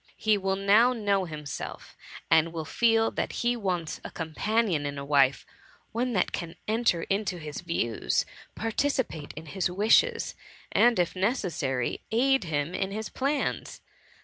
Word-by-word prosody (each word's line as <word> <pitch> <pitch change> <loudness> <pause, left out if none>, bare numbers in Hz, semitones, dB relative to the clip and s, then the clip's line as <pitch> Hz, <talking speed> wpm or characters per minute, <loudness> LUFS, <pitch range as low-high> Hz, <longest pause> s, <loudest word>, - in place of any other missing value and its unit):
He 215 -1 +3
will 195 -1 0
now 210 +6 +5
know 200 -5 +1
himself, 150 -3 -7 0.4
and 160 0 +5
will 160 -2 -4
feel 225 +2 +2
that - - -2
he 240 0 +3
wants 180 -7 -3
a - - -6
companion 180 +1 0
in 140 0 -5
a 140 - -5
wife: 140 -2 +3 0.5
one 245 +2 -1
that 185 - +1
can 170 -1 -5
enter 215 -6 +1
into 195 -2 -1
his 155 -1 -6
views, 145 -10 0 0.3
participate 225 - -1
in 155 +2 -8
his 185 +4 -1
wishes, 220 - +3 0.4
and 240 -1 +4
if 175 0 +1
necessary, 175 - -1
aid 260 -1 +3
him 150 +1 -2
in 190 - -1
his 215 +2 -4
plans. 280 +2 -2
190 Hz, 145 wpm, -28 LUFS, 160-225 Hz, 0.5 s, now